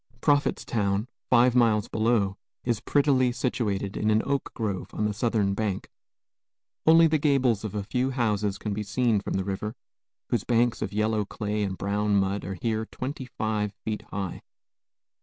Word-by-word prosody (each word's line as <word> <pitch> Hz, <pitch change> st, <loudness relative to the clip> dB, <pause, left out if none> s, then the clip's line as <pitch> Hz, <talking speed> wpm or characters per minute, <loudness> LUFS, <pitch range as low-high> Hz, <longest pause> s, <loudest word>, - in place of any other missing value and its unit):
Prophetstown, 115 Hz, -8 st, +1 dB, 0.2 s
five 125 Hz, 0 st, +5 dB
miles 115 Hz, -4 st, +3 dB
below, 110 Hz, -3 st, +1 dB, 0.3 s
is 120 Hz, -3 st, 0 dB
prettily 130 Hz, -1 st, +3 dB
situated 105 Hz, -6 st, -1 dB
in 105 Hz, -, 0 dB
an 110 Hz, 0 st, +3 dB
oak 140 Hz, -1 st, -1 dB
grove 105 Hz, -5 st, -3 dB
on 105 Hz, -, 0 dB
the 105 Hz, -, 0 dB
southern 110 Hz, -3 st, +1 dB
bank. 100 Hz, -2 st, -2 dB, 1.0 s
Only 165 Hz, +1 st, +8 dB
the 155 Hz, -1 st, +3 dB
gables 130 Hz, -7 st, +2 dB
of 105 Hz, -2 st, -5 dB
a 105 Hz, -, -1 dB
few 125 Hz, +6 st, 0 dB
houses 105 Hz, -6 st, 0 dB
can 105 Hz, 0 st, -3 dB
be 105 Hz, -, -2 dB
seen 110 Hz, +1 st, +1 dB
from -, -, -4 dB
the 95 Hz, -, 0 dB
river, 105 Hz, +3 st, -3 dB, 0.5 s
whose 115 Hz, -5 st, 0 dB
banks 120 Hz, 0 st, +2 dB
of -, -, -2 dB
yellow 110 Hz, +1 st, +1 dB
clay 105 Hz, +1 st, -3 dB
and 95 Hz, -2 st, -2 dB
brown 105 Hz, +1 st, 0 dB
mud 100 Hz, 0 st, +1 dB
are 95 Hz, +2 st, -4 dB
here 110 Hz, +3 st, -2 dB
twenty 130 Hz, +1 st, -5 dB
five 105 Hz, -4 st, -2 dB
feet 110 Hz, -1 st, -2 dB
high. 95 Hz, -3 st, -4 dB
110 Hz, 165 wpm, -27 LUFS, 100-120 Hz, 1.0 s, Only